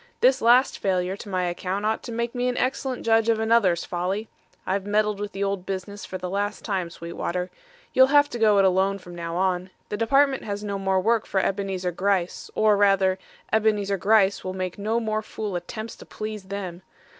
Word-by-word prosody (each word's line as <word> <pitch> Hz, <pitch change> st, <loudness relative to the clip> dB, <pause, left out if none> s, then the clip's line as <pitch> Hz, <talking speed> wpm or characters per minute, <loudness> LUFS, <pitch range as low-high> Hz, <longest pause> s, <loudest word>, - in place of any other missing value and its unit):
This 260 Hz, +1 st, +4 dB
last 245 Hz, +4 st, +4 dB
failure 185 Hz, -1 st, 0 dB
to 205 Hz, -, -9 dB
my 185 Hz, -1 st, 0 dB
account 185 Hz, +3 st, -2 dB
ought 220 Hz, +1 st, 0 dB
to 240 Hz, -, -7 dB
make 235 Hz, +1 st, -2 dB
me 250 Hz, 0 st, -1 dB
an 250 Hz, -, -1 dB
excellent 260 Hz, 0 st, -1 dB
judge 225 Hz, 0 st, +3 dB
of 225 Hz, -1 st, +3 dB
another's 220 Hz, -6 st, +3 dB
folly. 190 Hz, +5 st, -2 dB, 0.4 s
I've 190 Hz, +1 st, -1 dB
meddled 210 Hz, 0 st, +1 dB
with 205 Hz, 0 st, -4 dB
the 195 Hz, -, -3 dB
old 195 Hz, -2 st, -1 dB
business 195 Hz, +2 st, -5 dB
for 185 Hz, -, -5 dB
the 180 Hz, 0 st, -5 dB
last 205 Hz, +3 st, -2 dB
time, 190 Hz, -5 st, -1 dB
Sweetwater. 170 Hz, +2 st, -4 dB, 0.4 s
You'll 260 Hz, 0 st, +7 dB
have 290 Hz, +1 st, +5 dB
to 240 Hz, -, -4 dB
go 215 Hz, -2 st, +5 dB
it 195 Hz, -1 st, +5 dB
lone 190 Hz, +2 st, +2 dB
from 175 Hz, -2 st, -12 dB
now 170 Hz, -1 st, -5 dB
on. 185 Hz, 0 st, 0 dB, 0.2 s
The 210 Hz, -, -3 dB
Department 270 Hz, +5 st, +3 dB
has 205 Hz, 0 st, -4 dB
no 200 Hz, -1 st, -3 dB
more 190 Hz, -1 st, +1 dB
work 225 Hz, +3 st, +1 dB
for 195 Hz, -, +1 dB
Ebenezar 190 Hz, -2 st, -1 dB
Gryce, 185 Hz, 0 st, -1 dB
or 215 Hz, -1 st, +4 dB
rather 195 Hz, -2 st, +3 dB, 0.3 s
Ebenezar 210 Hz, -2 st, +2 dB
Gryce 200 Hz, 0 st, +3 dB
will 185 Hz, 0 st, -4 dB
make 185 Hz, 0 st, -4 dB
no 220 Hz, +3 st, 0 dB
more 215 Hz, -1 st, -1 dB
fool 215 Hz, -2 st, -5 dB
attempts 215 Hz, +6 st, -5 dB
to -, -, -12 dB
please 215 Hz, -2 st, -6 dB
them. 190 Hz, -3 st, -6 dB
200 Hz, 200 wpm, -25 LUFS, 185-220 Hz, 0.4 s, You'll